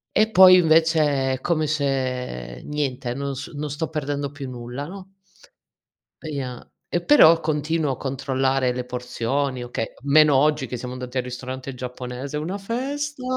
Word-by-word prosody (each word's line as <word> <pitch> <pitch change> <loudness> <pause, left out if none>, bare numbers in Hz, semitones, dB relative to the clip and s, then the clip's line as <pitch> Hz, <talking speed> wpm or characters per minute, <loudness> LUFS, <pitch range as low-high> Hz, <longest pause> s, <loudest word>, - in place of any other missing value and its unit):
e 220 - +4
poi 185 -3 +8
invece 155 -5 +3
è 130 - -5
come 160 -3 +1
se 130 - -2
niente, 135 -4 -3
non 140 0 -3
s 140 - -6
non 150 0 -4
sto 160 +2 -2
perdendo 145 -2 -3
più 145 -2 -7
nulla, 125 +2 -6
no? 190 +2 -10 1.1
E 160 - -7
ia 130 -4 -5 0.2
e 175 - 0
però 170 - +7
continuo 155 -1 0
a 130 - -4
controllare 135 -1 0
le 125 0 -4
porzioni, 125 +1 -2
okay, 115 -2 -4
meno 145 0 +5
oggi 145 -1 +2
che 125 - -5
siamo 125 +1 -6
andati 125 0 -6
al 130 - +1
ristorante 130 +2 -6
giapponese, 125 +2 -6
una 170 +6 -3
festa. 270 +6 -4
140 Hz, 155 wpm, -23 LUFS, 125-155 Hz, 1.1 s, poi